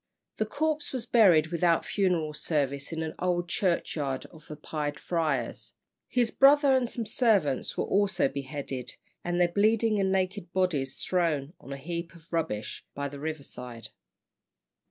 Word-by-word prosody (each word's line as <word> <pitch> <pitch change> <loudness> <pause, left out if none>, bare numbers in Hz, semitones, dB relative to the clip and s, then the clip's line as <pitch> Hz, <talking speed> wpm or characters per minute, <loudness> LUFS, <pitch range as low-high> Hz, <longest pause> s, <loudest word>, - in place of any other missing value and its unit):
The 215 - 0
corpse 305 +4 -1
was 255 -4 -2
buried 175 -10 +5
without 170 -1 +2
funeral 175 -6 0
service 140 -2 -1
in 160 0 -2
an 160 - -4
old 175 -1 0
churchyard 155 -7 -1
of 155 0 -16
the 150 - -7
Pied 150 -1 -4
Friars. 155 -8 -2 0.3
His 240 -2 +1
brother 280 0 +6
and 250 -2 +1
some 235 -2 -3
servants 205 - +2
were - - +1
also 195 -5 +2
beheaded, 135 -2 -5 0.3
and 175 0 -1
their 175 - +5
bleeding 215 +3 +3
and 190 -1 +2
naked 190 -1 -1
bodies 155 -8 0
thrown 165 -5 0
on 135 - -11
a 140 - -4
heap 170 +4 -5
of 165 0 -18
rubbish 110 -11 -2
by 140 0 -2
the 140 0 -9
river 155 -1 -4
side. 125 -3 -9
170 Hz, 155 wpm, -28 LUFS, 145-200 Hz, 0.3 s, brother